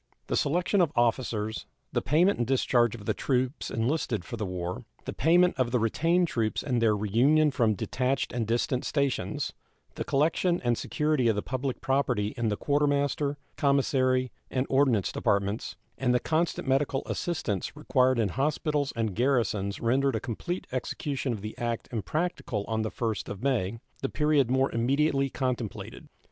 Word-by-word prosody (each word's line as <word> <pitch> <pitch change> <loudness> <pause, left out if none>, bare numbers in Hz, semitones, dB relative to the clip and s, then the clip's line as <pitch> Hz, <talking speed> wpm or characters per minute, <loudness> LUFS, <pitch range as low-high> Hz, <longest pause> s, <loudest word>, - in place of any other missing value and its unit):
The - - -2
selection 175 +6 +2
of 165 -4 +2
officers, 115 -2 0 0.3
the - - +1
payment 175 +5 +3
and 120 - 0
discharge 120 -3 +2
of 105 -3 -10
the - - +1
troops 130 +1 -1
enlisted 115 - -1
for 120 - -5
the 105 -3 -3
war, 90 +3 -4 0.2
the - - -4
payment 175 +2 +4
of 125 -2 +2
the 125 - +1
retained 165 +10 +2
troops 115 -7 -1
and 125 -5 0
their 110 -2 +3
reunion 135 +10 +3
from 115 -5 +2
detached 130 +7 -1
and 120 -3 -1
distant 120 +2 0
stations, 140 -3 -1 0.4
the - - -4
collection 165 +5 +1
and 120 -1 +2
security 150 -1 0
of 110 - +3
the 105 - -2
public 130 0 -3
property 125 -6 0
in 120 -3 -1
the 105 - -1
Quartermaster, 145 0 +1 0.2
Commissary, 130 -3 +2 0.2
and 130 0 0
Ordnance 130 -8 +3
departments, 100 +2 -1 0.2
and 125 -2 +2
the - - +4
constant 165 0 -1
medical 135 0 +1
assistance 145 - -2
required 130 0 +2
in 110 -3 +1
hospitals 145 - 0
and 110 -3 -1
garrisons 115 -6 +1
rendered 130 +2 +2
a - - 0
complete 150 - -4
execution 130 +1 -2
of 110 -4 -4
the 110 +1 -6
act 120 -1 -2
impracticable 120 - -2
on 110 -1 -1
the 110 - -1
1st 115 -2 -3
of 100 +3 -7
May, 115 -6 0 0.2
the 135 - -1
period 150 -4 +2
more 130 +1 +2
immediately 135 +3 +1
contemplated. 125 -5 -4
130 Hz, 165 wpm, -28 LUFS, 115-140 Hz, 0.4 s, payment